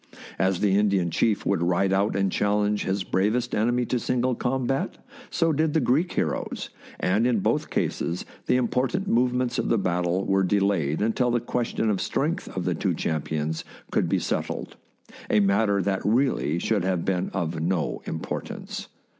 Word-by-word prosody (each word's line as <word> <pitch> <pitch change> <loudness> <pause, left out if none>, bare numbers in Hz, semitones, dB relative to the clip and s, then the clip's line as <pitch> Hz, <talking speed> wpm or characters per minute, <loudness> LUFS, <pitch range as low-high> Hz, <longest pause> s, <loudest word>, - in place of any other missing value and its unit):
As 95 -1 +1
the 100 -2 +3
Indian 100 -5 +2
chief 105 +5 +1
would 100 -4 +1
ride 90 +2 +2
out 100 +1 +1
and 95 -1 +1
challenge 105 +1 +1
his 95 0 0
bravest 110 +7 0
enemy 120 +3 +2
to 125 +1 0
single 125 +1 0
combat, 130 +2 -1 0.3
so 165 -1 +1
did 155 +1 +1
the 160 - +3
Greek 145 +7 +2
heroes, - - -2 0.3
and 105 +6 +2
in 120 -2 +2
both 95 - 0
cases 85 +1 -1 0.2
the - - +3
important 130 - 0
movements 125 -1 +1
of - - -1
the 115 - +3
battle 90 -1 0
were 95 0 +2
delayed 95 -5 +1
until 120 +3 +1
the 120 0 +2
question 120 -1 -1
of 100 - -1
strength - - -1
of - - -1
the - - +1
two - - -1
champions 80 0 -2 0.3
could - - +1
be - - +2
settled - - -3 0.3
— - - -20
a 105 - +4
matter 100 0 +2
that 95 0 0
really 105 - +1
should 105 +2 0
have 90 -2 0
been 95 -1 0
of 85 -3 -2
no 85 0 -1
importance. 80 - -5
100 Hz, 170 wpm, -25 LUFS, 95-120 Hz, 0.3 s, a